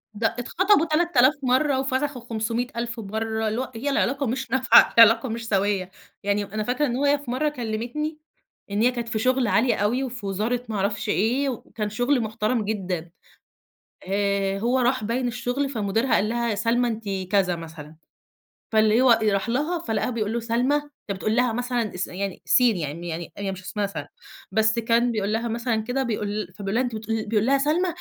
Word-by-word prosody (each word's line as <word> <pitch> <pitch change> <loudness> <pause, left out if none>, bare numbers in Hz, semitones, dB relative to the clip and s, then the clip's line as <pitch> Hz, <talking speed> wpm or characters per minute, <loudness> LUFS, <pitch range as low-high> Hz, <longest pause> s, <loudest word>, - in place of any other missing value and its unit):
ده 225 +2 +2
اتخطبوا 375 - +3
تلات 335 +1 0
آلاف 260 +4 +6
مرّة، 260 +2 +2
وفسخوا 265 0 -1
خُمسمية 230 +1 -2
ألف 235 0 -4
مرّة 220 +1 -2
اللي 220 +3 -1
هو 260 - -6
هي 255 +6 -2
العلاقة 275 0 +1
مش 260 +3 -3
نافعة، 260 -1 +6
العلاقة 230 +2 +7
مش 230 0 -5
سَويّة. 195 -2 0 0.3
يعني 205 +1 +1
أنا 215 +2 -4
فاكرة 250 +6 0
إن 245 -4 -1
هو 275 +3 0
هي 285 +1 +4
في 280 -4 -7
مرّة 300 +5 +1
كلّمتني، 245 +5 -4 0.5
إن 205 +1 0
هي 245 +2 +4
كانت 240 -2 -4
في 225 -2 -1
شُغل 255 +1 +2
عالي 225 +5 +3
أوي، 225 +6 0
وفي 250 -4 -6
وزارة 215 +6 -1
ما 220 - -3
أعرفش 205 +2 -1
إيه، 245 +8 +1
وكان 220 -3 -5
شُغل 245 +5 +1
محترم 220 +1 -1
جدًا. 185 -5 -3 1.0
آآ، 200 0 0
هو 245 +5 +1
راح 250 -1 +1
باين 245 +4 -1
الشغل، 245 +4 -2
فمديرها 225 +1 0
قال 210 - +1
لها: 235 0 -1
"يا 215 - 0
سلمى 230 +4 +1
أنتِ 225 -1 -3 0.3
كذا." 190 -3 +2
مثلًا، 160 -2 -10 0.8
فاللي 220 +1 +4
هو 240 -3 +5
راح 200 0 +1
لها، 300 +8 0
فلقاها 220 -4 -1
بيقول 220 -3 -2
له 235 - 0
:"سلمى!" 235 +5 +1
أنت 290 -9 -5
بتقول 215 +3 -1
لها 245 -1 +2
مثلًا 245 -3 -2
اس 180 - -2
يعني 195 0 -5
سين 245 -5 +4
يعني 165 +2 -5
يعني 165 +1 -5
هي 200 -1 -3
مش 190 -1 -7
اسمها 200 +2 -2
سلمى. 200 - -6 0.4
بس 220 +1 +2
كان 235 +1 +2
بيقول 210 -2 -1
لها 230 +2 -1
مثلًا 235 +1 -1
كده، 250 +4 -1
بيقول 210 -5 -3
فبيقول 200 0 -4
لها 250 - +3
أنتِ 240 -3 -3
بتقول 220 0 -3
بيقول 215 0 +1
لها: 275 +2 +4
"سلمى! 305 +7 +1
230 Hz, 195 wpm, -24 LUFS, 210-255 Hz, 1.0 s, العلاقة